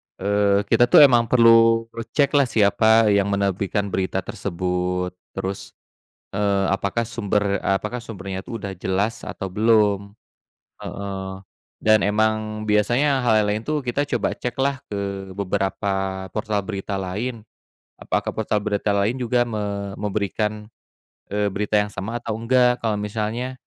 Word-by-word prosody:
Eee, 100 0 +2
kita, 120 - +5
tuh, 145 - +8
emang 120 -4 +5
perlu 115 -1 +5
recheck 115 +5 0
lah 140 -3 +3
siapa 110 0 +4
yang 100 -1 +3
menerbitkan 100 0 -1
berita 95 0 -1
tersebut. 90 0 -2 0.2
Terus, 95 +1 -5 0.6
eee, 100 -1 +1
apakah 100 +4 -1
sumber, 105 -3 -1
eee, 95 - +2
apakah 120 +3 -5
sumbernya 95 -3 -6
itu 115 - -6
udah 100 -2 -6
jelas 100 +5 -2
atau 95 - -5
belum, 105 0 +2 0.7
heeh. 95 -1 -6 0.4
Dan 110 0 +5
emang 110 0 0
biasanya 120 +7 +2
hal 110 -2 +4
yang - - 0
lain, 105 +2 -1
tuh, 150 -2 -1
kita 135 +4 -1
coba - - -1
cek 125 - -3
lah 140 0 0
ke 100 -2 -5
beberapa 100 +1 -1 0.4
portal 105 -1 -2
berita 100 0 -5
lain. 105 +5 -4 0.5
Apakah - - -2
portal 105 -1 0
berita 100 0 -1
lain 100 +5 +1
juga 120 -1 +1
me 100 -2 -4
memberikan, 105 +1 -2 0.6
eee, 105 +1 0
berita 105 +1 0
yang 105 0 0
sama 110 +5 -4
atau 115 -2 -4
enggak. 125 +1 +3
Kalau 110 -2 0
misalnya, 110 +4 -3
105 Hz, 140 wpm, -22 LUFS, 100-115 Hz, 0.7 s, tuh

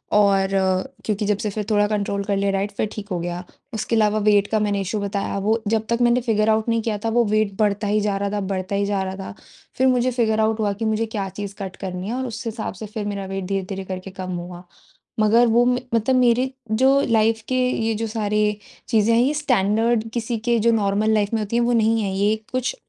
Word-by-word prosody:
और 200 -2 +4 0.6
क्योंकि 210 -1 -1
जब 205 0 +1
से 210 0 -2
फिर 210 +1 -3
थोड़ा 205 -1 +3
कंट्रोल 200 -1 -1
कर 200 0 -1
लिया 200 0 +1
डाइट 195 +1 -1
फिर 210 +1 -2
ठीक 210 -2 -7
हो 180 - -1
गया। 175 +1 -4 0.3
उसके 220 +1 -1
अलावा 215 -1 +3
वेट 205 -1 +4
का 220 - +1
मैंने 205 -1 0
इश्यू 210 +3 -2
बताया 200 0 -2
वो 225 +2 +2
जब 220 +1 +1
तक 235 - +2
मैंने 240 +1 +4
फिगर 220 -2 +1
आउट 220 +1 +2
नहीं 230 0 +1
किया 220 -1 -2
था - - +2
वो 240 - +5
वेट 215 -1 +1
बढ़ता 210 0 +1
ही 210 +1 +2
जा 205 -1 0
रहा 200 0 -1
था 210 - -1
बढ़ता 185 +1 -2
ही 200 0 +1
जा 200 -1 0
रहा 190 0 -4
था। 195 -1 -7 0.4
फिर 260 - +3
मुझे 255 0 +2
फिगर 225 -3 +1
आउट 220 0 +1
हुआ 205 -2 +1
कि 215 +3 -4
मुझे 220 +1 +1
क्या 210 -3 -4
चीज़ 200 +1 -7
कट 190 -1 -5
करनी 185 -1 -5
है 225 - -2
और 260 0 -2
उस 235 +1 -7
हिसाब 225 -1 -4
से 205 +3 -8
फिर 210 0 -5
मेरा 200 -1 -3
वेट 195 0 -4
धीरे-धीरे 195 0 -3
करके 185 0 -6
कम 185 0 -4
हुआ। 175 0 -7 0.6
मगर 225 +3 +5
वो 235 +2 +4
में 250 0 +1
मतलब 230 +3 +2
मेरी 250 +1 +3 0.2
जो 265 +5 +4
लाइफ़ 225 0 +3
के 255 - -1
ये 225 -2 0
जो 225 +1 -2
सारे 210 -1 -1 0.5
चीज़ें 225 0 +3
हैं 230 - +4
ये 270 +4 +2
स्टैंडर्ड 225 -4 +1
किसी 235 0 -2
के 235 -1 +3
जो 230 +2 +3
नॉर्मल 210 0 +1
लाइफ़ 205 -2 +2
में 225 - +1
होती 210 +2 -3
है 240 - +3
वो 240 +1 +2
नहीं 225 0 +3
है 195 - -1
ये 205 +2 +2 0.2
कुछ 255 - -1
215 Hz, 245 wpm, -22 LUFS, 200-230 Hz, 0.6 s, वो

